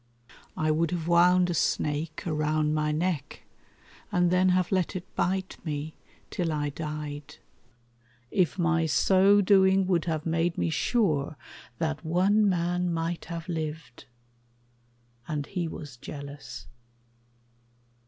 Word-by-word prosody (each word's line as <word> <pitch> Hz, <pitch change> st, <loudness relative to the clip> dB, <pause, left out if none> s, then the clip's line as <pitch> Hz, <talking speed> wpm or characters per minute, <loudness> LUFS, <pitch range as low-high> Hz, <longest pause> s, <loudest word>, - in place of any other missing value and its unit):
I 155 Hz, 0 st, +1 dB
would 160 Hz, +1 st, +1 dB
have 170 Hz, -1 st, -3 dB
wound 180 Hz, +1 st, +5 dB
a -, -, 0 dB
snake 155 Hz, 0 st, -1 dB
around 155 Hz, -1 st, 0 dB
my 150 Hz, 0 st, +1 dB
neck 160 Hz, -1 st, -2 dB, 0.7 s
And 175 Hz, -1 st, +2 dB
then 185 Hz, +1 st, +4 dB
have 180 Hz, -1 st, +2 dB
let 185 Hz, 0 st, 0 dB
it 185 Hz, -1 st, -7 dB
bite 190 Hz, +1 st, -1 dB
me 155 Hz, -1 st, -4 dB, 0.4 s
till 170 Hz, -3 st, -1 dB
I 145 Hz, -1 st, -1 dB
died, 150 Hz, -1 st, -6 dB, 1.0 s
If 180 Hz, -4 st, +1 dB
my 170 Hz, -2 st, +2 dB
so 195 Hz, +5 st, +4 dB
doing 190 Hz, -1 st, +4 dB
would 175 Hz, -3 st, +1 dB
have 160 Hz, -2 st, -2 dB
made 165 Hz, +1 st, 0 dB
me 165 Hz, -, 0 dB
sure 155 Hz, -, +1 dB, 0.4 s
That 155 Hz, -1 st, -2 dB
one 195 Hz, +6 st, +3 dB
man 180 Hz, 0 st, 0 dB
might 165 Hz, 0 st, -2 dB
have 170 Hz, 0 st, -6 dB
lived; 155 Hz, -6 st, -5 dB, 1.2 s
and 150 Hz, -2 st, -2 dB
he 175 Hz, -1 st, -3 dB
was 145 Hz, -5 st, -8 dB
jealous. 140 Hz, +2 st, -8 dB
165 Hz, 125 wpm, -27 LUFS, 155-180 Hz, 1.2 s, wound